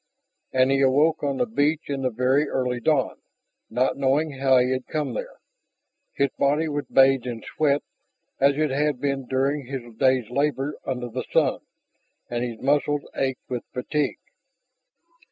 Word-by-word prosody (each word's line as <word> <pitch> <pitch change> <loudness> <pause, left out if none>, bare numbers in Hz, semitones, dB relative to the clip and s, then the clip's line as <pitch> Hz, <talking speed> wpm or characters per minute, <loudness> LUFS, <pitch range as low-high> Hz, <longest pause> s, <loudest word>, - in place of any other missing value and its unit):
And 130 0 +3
he 135 0 +2
awoke 145 +4 +3
on 140 -2 -1
the - - +2
beach 160 -7 0
in 140 -1 -3
the 130 - +1
very 130 +5 +1
early 125 -2 -1
dawn, 140 +1 +1 0.5
not 125 +4 0
knowing 140 +3 +1
how 135 -1 +4
he 125 +1 +3
had 130 -1 -2
come 155 -1 -2
there. - - -6 0.8
His 140 0 +1
body 150 +3 +2
was 145 -1 -3
bathed 135 -2 +4
in 115 -3 -5
sweat, 145 -2 0 0.6
as 140 +1 +4
it 155 -2 +1
had 145 -1 0
been 140 -2 -2
during 135 +1 0
his 125 -3 -6
day's 130 -3 +3
labors 140 +1 0
under 125 -2 -2
the 115 - -5
sun, - - +2 0.7
and 120 0 -1
his 120 -2 -4
muscles 145 +1 +1
ached 130 -1 -2
with 125 -2 -4
fatigue. 145 +4 -1
135 Hz, 160 wpm, -24 LUFS, 130-145 Hz, 0.8 s, how